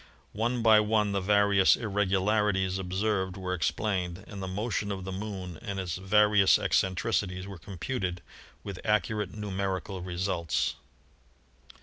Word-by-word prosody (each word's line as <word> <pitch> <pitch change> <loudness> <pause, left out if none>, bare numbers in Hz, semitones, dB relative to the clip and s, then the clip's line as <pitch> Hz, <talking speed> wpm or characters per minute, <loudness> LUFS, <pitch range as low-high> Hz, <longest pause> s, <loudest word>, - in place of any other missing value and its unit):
One 115 +3 -1
by 110 -1 +7
one 105 -1 +2
the 100 -1 0
various 100 0 +4
irregularities 100 -2 +1
observed 95 0 -1
were 90 -1 -3
explained, 90 +1 -1
and 100 -2 -8
the 95 - -4
motion 105 +2 -2
of 95 -1 -4
the 95 - -5
Moon 95 -4 -6
and 100 -1 -4
its 90 -2 -3
various 105 +1 +4
eccentricities 95 -1 0
were 100 -3 -9
computed 90 - -4 0.4
with 100 -2 -6
accurate 105 -1 0
numerical 95 -2 -3
results. 90 -2 -1
95 Hz, 125 wpm, -29 LUFS, 95-105 Hz, 0.4 s, by